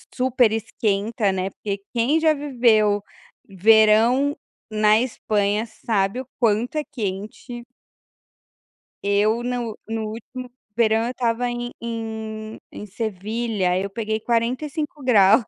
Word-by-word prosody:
super 250 -3 +3
esquenta, 215 -1 0
né, 190 0 -2
porque 200 0 -5
quem 245 +7 +2
já 315 -1 +4
viveu 235 -8 +2 0.5
verão 220 +7 +4 0.4
na 215 0 +4
Espanha 210 -3 0
sabe 215 0 -1
o 260 - -12
quanto 230 +4 +1
é 305 - 0
quente. 215 +2 -5 1.4
Eu 210 +3 +2
no 245 -3 -3
no 225 -1 -3
último 250 +3 -8 0.2
verão 225 -1 +3
eu 240 - -2
estava 245 -1 0
em 240 0 -4
em 220 -1 -5
em - - -8
Sevilha 210 -1 -2
eu 200 +1 -3
peguei 220 +1 -2
45ºC. 245 - +2
225 Hz, 110 wpm, -23 LUFS, 210-245 Hz, 1.4 s, já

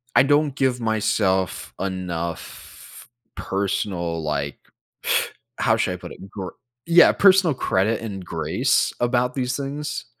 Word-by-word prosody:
I - - +7
don't 145 0 +2
give 130 -3 +1
myself 105 -4 0
enough 90 -3 -6 0.3
personal, 90 -4 -2
like 70 -2 -2 1.0
how - - +3
should - - 0
I - - -5
put - - -10
it? 95 - -12
Gr 95 -2 -6 0.4
yeah, 170 +1 +7
personal 190 -5 +5
credit 105 +2 0
and 100 -5 -6
grace 80 -2 +1
about 125 +1 +1
these 125 -1 -1
things. 145 +1 -4
105 Hz, 125 wpm, -23 LUFS, 95-135 Hz, 1.0 s, I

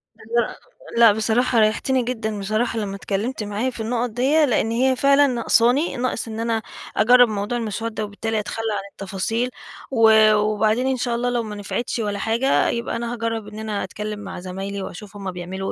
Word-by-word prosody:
لا، 235 +2 -2 0.4
لا، 230 -2 +8
بصراحة 225 +3 +1
ريحتني 230 +4 +2
جدًا 220 -3 -3
بصراحة 215 +3 -1
لما 200 -2 -3
اتكلمت 210 +4 -3
معايا 210 +5 -2
في 235 -3 -6
النقط 240 +1 -1
ديّة، 275 +7 +3
لأن 225 -3 +1
هي 260 +2 +2
فعلًا 280 +2 +4
نقصاني، 245 +3 +2
ناقص 245 -2 -2
إن 220 0 -6
أنا 230 -1 0 0.4
أجرب 245 +3 +6
موضوع 210 +3 -2
المسودة 225 0 -3
وبالتالي 220 +2 -3
أتخلى 225 +2 -4
عن 200 - -2
التفاصيل، 205 +5 -2 0.4
و 220 -3 +6
وبعدين 215 +4 +1
إن 260 -1 +1
شاء 240 -1 -1
الله 245 +1 0
لو 240 -1 0
ما 210 -1 -6
نفعتش 230 +4 -3
ولا 205 -2 -2
حاجة 235 +6 +2
يبقى 235 0 -2
أنا 235 0 -3
هاجرب 230 -2 -3
إن 215 +1 -9
أنا 215 -2 -3
أتكلم 210 +2 -5
مع 195 -3 -7
زمايلي 195 +2 -5
وأشوف 195 +2 -8
هم 195 -2 -5
بيعملوا 185 +2 -5
225 Hz, 180 wpm, -22 LUFS, 210-245 Hz, 0.4 s, لا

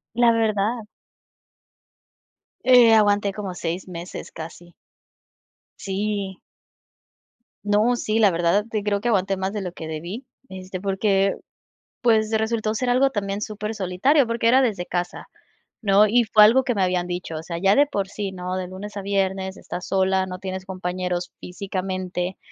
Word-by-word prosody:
La 240 -1 +5
verdad. 220 0 0 1.8
Eh, 245 -3 +7
aguanté 205 -2 +3
como 195 -3 -5
6 175 +2 -4
meses 175 0 -8
casi. 170 +2 -10 1.0
Sí. 200 -1 -3 1.2
No, 210 +4 +3
sí, 220 -1 -1
la 210 -3 +6
verdad, 175 +4 +1 0.2
creo 205 -1 0
que 240 - -2
aguanté 195 -3 +1
más 190 +1 -2
de 210 - -3
lo 180 -2 -4
que 165 -2 -8
debí, 170 - -6 0.2
este, 185 0 -7
porque, 195 0 +1 0.7
pues, 220 -3 +3
resultó 220 0 0
ser 245 +3 -1
algo 260 +3 +4
también 200 -4 -3
supersolitario 215 - +1
porque 230 0 0
era 260 +3 +6
desde 205 -9 0
casa, 175 0 -4 0.6
¿no?, 200 +1 +5
y 235 +3 +3
fue 215 -1 +6
algo 255 +5 +5
que 250 -2 0
me 195 - 0
habían 180 -1 +1
dicho, 175 -2 -5
o 155 - -5
sea, 170 -1 -5
ya 195 +3 +3
de 285 - +5
por 200 -8 -2
sí, 200 -1 -4
¿no?, 180 0 -4
de 185 -1 -3
lunes 200 +3 -8
a 200 - -4
viernes, 190 -1 -1
estás 180 - -7
sola, 190 0 +1
no 180 0 -6
tienes 190 0 -5
compañeros 180 -1 -3
físicamente, 185 -1 -4
195 Hz, 155 wpm, -23 LUFS, 185-215 Hz, 1.8 s, Eh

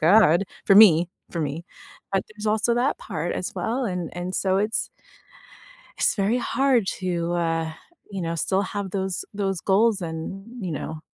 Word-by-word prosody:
God 175 +1 +5 0.2
for 195 - +5
me, 180 -5 +8 0.2
for 170 - -3
me, 155 +3 -3 0.5
but 195 - +1
there's 215 0 -7
also 220 +2 +2
that 255 - +1
part - - -3
as - - -4
well, 245 +3 -1
and 180 -5 -3
and 180 +1 -4
so 190 -1 +1
it's 210 +3 0 1.1
it's - - +2
very 210 +4 +1
hard 260 -4 +2
to, 175 -2 -1
uh, 165 -2 -1 0.4
you 195 -2 -4
know, 165 0 -2
still 190 +4 +1
have 200 -1 -4
those 190 -2 -2
those 195 -3 -2
goals 205 +1 +3
and, 195 +8 -6
you 175 - -3
know 155 +1 -5
195 Hz, 165 wpm, -24 LUFS, 170-215 Hz, 1.1 s, me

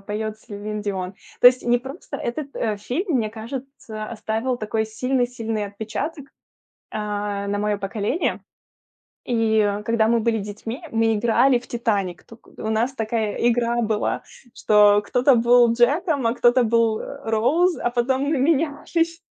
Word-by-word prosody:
поет 215 +1 -4
Селин 210 -1 -6
Дион, 190 -2 -4 0.3
то - - +8
есть 250 0 +6
не 240 0 +3
просто 275 +3 -8
Этот, 275 +3 -5
э, 215 -2 -1
фильм, 305 - -1
мне 220 -3 0
кажется, 225 -1 -7
оставил 225 +3 -2
такой 220 -1 -2
сильный 250 +3 0
сильный 225 -3 -3
отпечаток, 225 +9 -5 0.7
а, 205 -1 -3
на 205 0 -1
моё 210 0 0
поколение. 205 - -2 0.8
И, 225 -2 +1
э, 205 -1 +1
когда 225 0 +2
мы 235 0 +3
были 225 0 +1
детьми, 215 - -6
мы 225 -1 +2
играли 240 +4 +3
в 245 - -17
"Титаник", 200 -7 -2
туку 230 +1 -17
у 220 - -4
нас 230 +4 0
такая 220 -3 -2
игра 235 0 +1
была, 215 -2 -1 0.3
что 210 -1 +5
кто-то 250 +5 +3
был 240 0 +5
"Джеком", 280 +3 +2
а 230 - +1
кто-то 245 +1 +4
был 230 -1 +2 0.2
"Роуз", 290 +12 +2
а - - -1
потом 260 +2 0
мы 290 +1 0
менялись. 325 +3 0
230 Hz, 150 wpm, -22 LUFS, 215-255 Hz, 0.8 s, то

